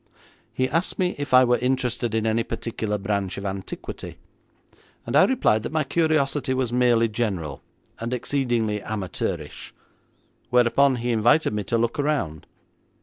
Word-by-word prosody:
He 130 Hz, -, 0 dB
asked 165 Hz, +6 st, -1 dB
me 180 Hz, -1 st, +1 dB
if 145 Hz, -1 st, -4 dB
I 130 Hz, 0 st, +7 dB
were 120 Hz, -1 st, +2 dB
interested 125 Hz, -2 st, -1 dB
in 110 Hz, 0 st, 0 dB
any 110 Hz, +1 st, +2 dB
particular 110 Hz, -2 st, -3 dB
branch 100 Hz, -1 st, -2 dB
of 100 Hz, -, -6 dB
antiquity, 95 Hz, -1 st, -6 dB, 0.9 s
and -, -, -3 dB
I -, -, +7 dB
replied 110 Hz, +1 st, +2 dB
that -, -, -5 dB
my 155 Hz, -1 st, +1 dB
curiosity 145 Hz, -3 st, +1 dB
was 130 Hz, -2 st, -1 dB
merely 120 Hz, -2 st, +4 dB
general, 100 Hz, -, -3 dB, 0.4 s
and 115 Hz, +1 st, -4 dB
exceedingly 120 Hz, -5 st, -1 dB
amateurish, 95 Hz, -6 st, -4 dB, 0.7 s
whereupon 125 Hz, +2 st, +4 dB
he 120 Hz, 0 st, -2 dB
invited 120 Hz, +5 st, +3 dB
me 105 Hz, -1 st, -2 dB
to 115 Hz, +4 st, 0 dB
look 115 Hz, +6 st, -1 dB
around. 140 Hz, -, -1 dB
120 Hz, 145 wpm, -24 LUFS, 105-130 Hz, 0.9 s, I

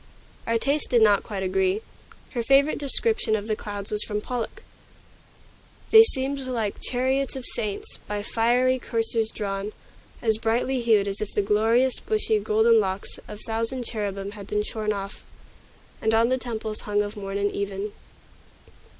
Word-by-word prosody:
Our 230 Hz, 0 st, +2 dB
tastes 280 Hz, +5 st, +1 dB
did 235 Hz, -3 st, +4 dB
not 205 Hz, -2 st, +5 dB
quite 195 Hz, -3 st, -5 dB
agree. 190 Hz, +2 st, +1 dB, 0.5 s
Her 240 Hz, -, -1 dB
favorite 275 Hz, +5 st, +4 dB
description 290 Hz, -, +2 dB
of 205 Hz, -1 st, -3 dB
the 215 Hz, -1 st, 0 dB
clouds 205 Hz, -1 st, -6 dB
was 210 Hz, 0 st, 0 dB
from 210 Hz, -1 st, -2 dB
Pollok: 250 Hz, -, -5 dB, 1.3 s
"They 445 Hz, -, +11 dB
seemed 275 Hz, -9 st, +1 dB
like 240 Hz, -6 st, -2 dB
chariots 260 Hz, +2 st, 0 dB
of 260 Hz, -2 st, -5 dB
saints, 210 Hz, -4 st, -4 dB
By 205 Hz, 0 st, -3 dB
fiery 245 Hz, +4 st, +2 dB
coursers 225 Hz, -2 st, -1 dB
drawn; 200 Hz, -1 st, -4 dB, 0.5 s
as 220 Hz, -2 st, +2 dB
brightly 240 Hz, +3 st, 0 dB
hued 220 Hz, -4 st, +3 dB
As 200 Hz, +1 st, -3 dB
if 215 Hz, -, -3 dB
the 205 Hz, -, +2 dB
glorious, 225 Hz, +5 st, +2 dB
bushy, 430 Hz, -, +1 dB
golden 220 Hz, +2 st, +4 dB
locks 190 Hz, -1 st, -2 dB
Of 210 Hz, 0 st, -8 dB
thousand 230 Hz, +3 st, -2 dB
cherubim 200 Hz, -3 st, -3 dB
had 205 Hz, -2 st, -9 dB
been 210 Hz, 0 st, 0 dB
shorn 215 Hz, 0 st, -2 dB
off, 200 Hz, -1 st, -5 dB, 0.8 s
And 220 Hz, 0 st, +2 dB
on 230 Hz, +1 st, +4 dB
the 260 Hz, 0 st, +1 dB
temples 220 Hz, -3 st, -3 dB
hung 205 Hz, 0 st, +2 dB
of 205 Hz, +1 st, -6 dB
morn 195 Hz, -1 st, -4 dB
and 205 Hz, 0 st, 0 dB
even." 200 Hz, +1 st, -3 dB
220 Hz, 160 wpm, -25 LUFS, 205-245 Hz, 1.3 s, They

